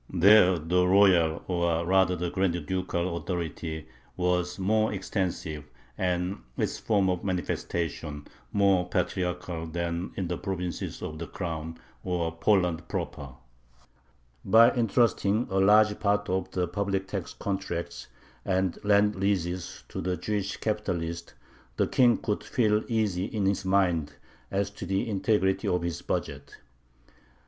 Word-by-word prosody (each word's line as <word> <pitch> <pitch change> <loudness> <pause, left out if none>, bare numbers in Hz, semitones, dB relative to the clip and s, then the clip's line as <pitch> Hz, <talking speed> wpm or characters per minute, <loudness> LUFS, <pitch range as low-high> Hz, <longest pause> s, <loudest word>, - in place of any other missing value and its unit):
There 95 0 +6
the 90 +3 +1
royal, 90 -4 +4
or 85 -2 0
rather 95 0 +3
the 90 0 -3
grand 85 -4 0
ducal, 90 -1 -2
authority 80 -3 -4 0.3
was 90 0 0
more 110 +3 +2
extensive 90 -6 -3 0.3
and 90 +1 -1 0.2
its - - -1
form 100 -4 +2
of 90 -1 -1
manifestation 85 -5 -3 0.3
more 95 -3 +3
patriarchal 90 -2 -2
than 85 +2 -3
in 95 - -2
the 90 0 -3
provinces 90 -3 -4
of 80 0 -5
the 85 - -5
Crown, 80 -2 -5 0.3
or 85 -2 -2
Poland 90 -2 +1
proper. 70 -2 -5 1.1
By 115 +4 +6
intrusting 115 -2 +2
a 95 - +2
large 105 +2 +5
part 105 0 +1
of 95 0 -1
the 90 -1 -1
public 95 +1 -2
tax 100 -3 -5
contracts 95 -4 -4 0.4
and 95 -1 -1
land 105 0 +3
leases 95 -2 -2
to - - -5
the 90 +1 -1
Jewish 100 -2 -2
capitalists, 85 -6 -3 0.4
the - - +3
King 120 -2 +4
could 105 -2 -2
feel 110 -4 +1
easy 105 -5 0
in 105 -1 -2
his 100 0 0
mind 90 -6 +1 0.4
as 100 +1 -1
to 100 -2 -8
the 95 +5 0
integrity 100 -2 +1
of 90 -1 +1
his 85 -2 -3
budget. - - -4
95 Hz, 135 wpm, -28 LUFS, 85-100 Hz, 1.1 s, There